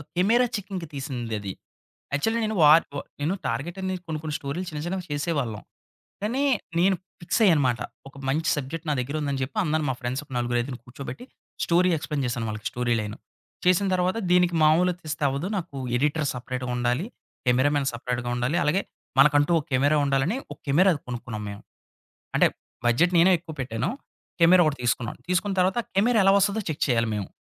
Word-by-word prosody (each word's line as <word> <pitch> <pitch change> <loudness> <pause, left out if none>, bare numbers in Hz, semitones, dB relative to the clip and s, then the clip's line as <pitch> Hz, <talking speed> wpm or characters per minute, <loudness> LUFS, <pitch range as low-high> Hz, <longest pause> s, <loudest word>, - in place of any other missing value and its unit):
ఒక - - -10
camera 230 +7 +4
చెకింగ్‌కి 190 -4 -5
తీసిందది. 120 -8 -4 0.6
Actually 225 +11 +1
నేను 215 0 -2
war 155 +2 +8
వ - - -1 0.2
నేను 160 +7 0
టార్గెట్ 135 +10 -3
అనేది 185 -1 -3
కొన్ని 155 -1 -3
కొన్ని 150 -1 -3
స్టోరీలు 145 +7 -4
చిన్న 150 -1 -5
చిన్నవి 180 0 -3
చేసేవాళ్ళం. 140 -8 -2 0.6
కానీ 250 +7 0 0.4
నేను 190 +2 +4 0.3
ఫిక్స్‌య్యానమాట. 160 - +3 0.3
ఒక 135 - -15
మంచి 155 +4 +1
సబ్జెక్ట్ 155 +4 -5
నా 150 - +2
దగ్గరుందని 140 +1 -2
జెప్పి, 130 +11 -4
అందరు 155 -2 0
మా 130 - +1
ఫ్రెండ్స్ 125 +3 -2
ఒక 135 - -22
నలుగురు, 120 0 0
ఐదుగురు 120 -2 -6
కూర్చోబెట్టి, 130 - -8 0.4
స్టోరీ 180 +2 +3
ఎక్స్‌ప్లెయిన్ 150 -2 -3
చేశాను 120 -1 -2
వాళ్ళకి 110 0 -4
స్టోరీ 120 -1 0
లైను. 105 +1 -5 0.5
చేసిన 185 +2 +4
తర్వాత 185 +4 +1
దీనికి 180 -1 +4
మామూలుగా 170 +3 +4
తీస్తే 155 -1 -4
అవ్వదు, 140 +7 -2
నాకు 170 -6 -5 0.2
ఎడిటర్ 150 +2 +1
సెపరేట్‌గా 125 0 -4
ఉండాలి. 125 +8 0 0.4
కెమెరామన్ 135 +3 +3
సెపరేట్‌గా 120 0 -3
ఉండాలి. 125 +8 0
అలాగే 170 +7 +2 0.4
మనకంటూ 145 +2 +5
ఒక - - -6
కెమెరా 145 +4 +3
ఉండాలని 140 - +1 0.2
ఒక - - -19
కెమెరా 180 +8 +5 0.2
కొనుక్కున్నాం 120 -3 -5
మేము. 100 - -8 0.7
అంటే - - +5 0.4
బడ్జెట్ 170 +10 +3
నేనే 180 +3 +6
ఎక్కువ 165 -1 -10
పెట్టాను. 120 +3 -2 0.5
కెమెరా 175 +2 +7
ఒకటి 145 -3 0
తీసుకున్నాను. 115 -1 -1
తీసుకున్న 180 +2 +1
తర్వాత 185 +3 +2
ఆ - - -25
కెమెరా 220 +4 +3
ఎలా 195 - +6
వస్తుందో 200 +2 +2
చెక్ 155 - -4
చేయాలి 115 -3 +2
మేము. 100 -2 -3
150 Hz, 170 wpm, -25 LUFS, 125-180 Hz, 0.7 s, war